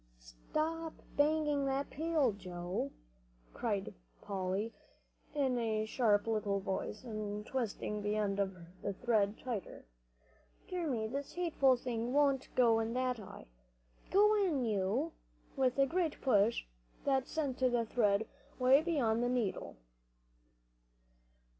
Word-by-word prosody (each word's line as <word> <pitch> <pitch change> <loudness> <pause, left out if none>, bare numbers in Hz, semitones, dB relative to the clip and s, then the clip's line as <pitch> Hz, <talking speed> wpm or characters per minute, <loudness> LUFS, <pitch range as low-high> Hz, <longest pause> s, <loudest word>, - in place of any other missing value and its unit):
"Stop 310 - -3 0.2
banging 295 -1 +2
that 270 +1 -1
pail, 310 -4 +2
Joe," 180 -5 -4 0.6
called 205 -5 -2 0.3
Polly, 195 +3 -2 0.6
in 265 -4 +1
a 220 -2 0
sharp 215 -3 +2
little 210 -3 0
voice, 195 +3 -3
and 210 -3 -4
twisting 220 -4 -2
the 205 +1 0
end 200 -2 0
of 195 -1 0 0.3
the 200 - -2
thread 215 -1 +1
tighter. 230 - -5 0.8
"Dear 360 -3 -2
me, 225 -5 0
this 275 +5 -4
hateful 315 -7 +3
thing 240 0 -3
won't 280 -2 +3
go 230 -3 +5
in 225 +1 -2
that 255 -2 0
eye. 200 - -10 0.6
Go 420 +2 +5
in, 295 -10 +1
you!" 215 - 0 0.4
with 260 -2 +2
a 275 - +5 0.3
push 225 -3 +3 0.4
that 270 -2 +2
sent 290 -5 -2
the 245 -3 +2
thread 220 -2 +2 0.3
way 260 +3 +6
beyond 260 -9 +1
the 245 - +1
needle. 240 - -1
235 Hz, 120 wpm, -34 LUFS, 210-275 Hz, 0.8 s, way